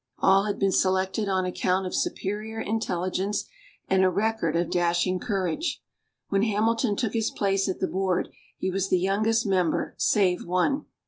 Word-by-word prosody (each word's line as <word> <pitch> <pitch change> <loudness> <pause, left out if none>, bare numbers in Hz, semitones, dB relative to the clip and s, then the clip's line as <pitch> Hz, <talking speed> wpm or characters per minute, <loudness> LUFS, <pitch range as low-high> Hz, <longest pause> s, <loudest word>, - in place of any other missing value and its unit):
All 195 +1 +4
had 205 - -2
been 195 -1 +2
selected 190 +2 +1
on 190 -1 +1
account 185 +1 0
of 185 - -4
superior 215 +3 -2
intelligence 200 -2 -1 0.4
and 190 0 +3
a 185 - +5
record 200 -3 0
of 170 0 0
dashing 175 +1 +1
courage. 200 - -2 0.5
When 195 -1 +2
Hamilton 220 +1 +1
took 225 -1 -2
his 225 -1 0
place 195 -1 0
at 185 - -3
the - - 0
board, 190 -1 -1 0.3
he 190 - -2
was 195 +1 -1
the 185 - +3
youngest 215 +5 +1
member, 185 -5 0
save 200 -11 +2
one. 185 +12 0
195 Hz, 165 wpm, -26 LUFS, 185-215 Hz, 0.5 s, a